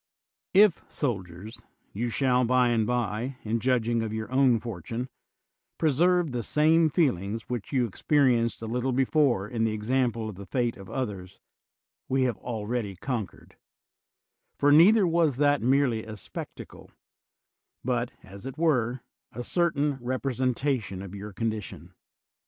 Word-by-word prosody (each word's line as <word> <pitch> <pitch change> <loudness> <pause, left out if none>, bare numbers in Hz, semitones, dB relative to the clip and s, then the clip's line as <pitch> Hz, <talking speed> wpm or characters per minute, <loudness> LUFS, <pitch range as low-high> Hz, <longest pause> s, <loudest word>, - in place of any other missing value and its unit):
If, 200 -3 +6
soldiers, 100 - -4 0.3
you 120 +4 -2
shall 125 +1 +2
by 125 0 +3
and 115 -2 +1
by, 120 +1 -1
in 115 +2 -1
judging 120 -1 +1
of 110 -1 -3
your 110 0 -5
own 130 -3 +4
fortune, 115 +3 -5 0.7
preserve 170 +2 +2
the 120 -1 -2
same 155 +6 +3
feelings 115 - 0
which 120 -5 -5
you 130 -3 +2
experienced 120 0 +1
a - - -3
little 125 +3 -1
before 130 -5 +2
in 115 +1 -2
the 110 -1 +1
example 115 +1 0
of 110 - -5
the 100 -1 -9
fate 120 +2 -1
of 95 -1 -12
others, 100 -8 -5 0.7
we 130 0 +2
have 125 -4 0
already 110 -3 -3
conquered; 110 -1 -5 1.0
for 145 - +3
neither 190 +7 +7
was 165 -5 +2
that 145 +1 +2
merely 125 -3 +2
a 110 -1 -8
spec - - -7
tacle, - - -12 1.0
but, 120 -1 0
as 100 +5 -10
it 135 +1 -7
were, 130 -7 +1 0.3
a 120 - -6
certain 150 -4 0
representation 125 -4 -1
of 95 -1 -9
your 100 +1 -7
condition. 110 0 -4
120 Hz, 140 wpm, -27 LUFS, 110-135 Hz, 1.0 s, neither